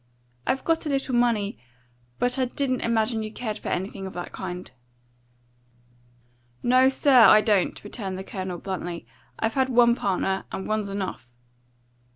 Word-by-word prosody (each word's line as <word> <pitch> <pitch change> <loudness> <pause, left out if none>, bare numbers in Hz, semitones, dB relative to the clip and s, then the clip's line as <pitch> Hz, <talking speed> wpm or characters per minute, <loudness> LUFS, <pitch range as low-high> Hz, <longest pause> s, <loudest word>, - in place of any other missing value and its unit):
"I've 265 0 0
got 330 -1 0
a - - -1
little 275 -2 -1
money, 230 -4 +1 0.6
but 245 +2 0
I 260 - +3
didn't 255 0 -1
imagine 225 0 +1
you 215 0 -5
cared 220 -2 -4
for - - -5
anything 190 +1 -3
of 190 - -8
that 175 0 -6
kind." 180 -1 -6 1.9
"No, 255 +2 +5
sir, 265 -3 +6
I 215 - +8
don't," 205 -4 +1
returned 200 -3 -5
the 190 - -5
Colonel 185 -2 -5
bluntly. 175 -2 -5 0.3
"I've 225 0 -1
had 265 -1 +1
one 240 -1 +5
partner, 195 -3 -1
and 190 - -5
one's 215 -1 -1
enough." 190 -11 -5
215 Hz, 155 wpm, -25 LUFS, 190-250 Hz, 1.9 s, I